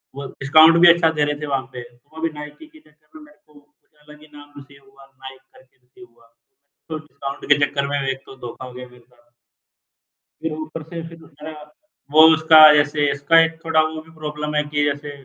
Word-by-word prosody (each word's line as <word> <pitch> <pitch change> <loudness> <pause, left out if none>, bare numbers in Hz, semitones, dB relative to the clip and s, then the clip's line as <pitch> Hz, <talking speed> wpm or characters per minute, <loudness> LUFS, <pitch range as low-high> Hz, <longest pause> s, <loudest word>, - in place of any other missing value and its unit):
वो 140 0 -8
डिस्काउंट 155 +4 +5
भी 175 - +7
अच्छा 170 -1 +1
दे 150 -2 -2
रहे 145 0 -3
थे - - -4
वहाँ 135 -2 -2
पे, 125 - -8
तो 120 0 -20 0.2
वहाँ 160 - -11
भी - - -5
नाइकी 150 - -12
के 315 0 -21
चक्कर 155 - -23
में 310 - -15
मेरे 300 0 -23
को 150 - -26
कुछ 145 0 -26 0.2
अलग 150 0 -17
ही 155 - -18
नाम 145 0 -16
रिसीव 140 0 -16
हुआ, 135 0 -19
नाइक 135 0 -15
करके 130 0 -25
रिसीव 130 +9 -20
हुआ, 115 -1 -26 0.6
तो 160 - -5
डिस्काउंट 140 -2 -10
के 145 - -3
चक्कर 140 -1 -4
में 145 0 -3
एक 135 0 -5
तो - - -14
धोखा 125 - -10
हो 125 - -12
गया 125 0 -11
मेरे 125 0 -20
साथ। 120 0 -32 1.1
फिर 160 - -4
ऊपर 155 +1 -8
से 165 0 -8
फिर 165 0 -15
दूसरा, 155 -1 -13 0.6
वो 155 +2 +5
उसका 160 0 +4 0.2
ऐसे 145 0 -1
इसका 145 +4 +2
एक 165 0 -6
थोड़ा 165 -1 +1
वो 155 0 -5
भी 160 - -21
प्रॉब्लम 150 0 -6
है 150 - +1
कि 145 0 -2
जैसे, 145 0 -4
150 Hz, 225 wpm, -19 LUFS, 135-155 Hz, 1.1 s, भी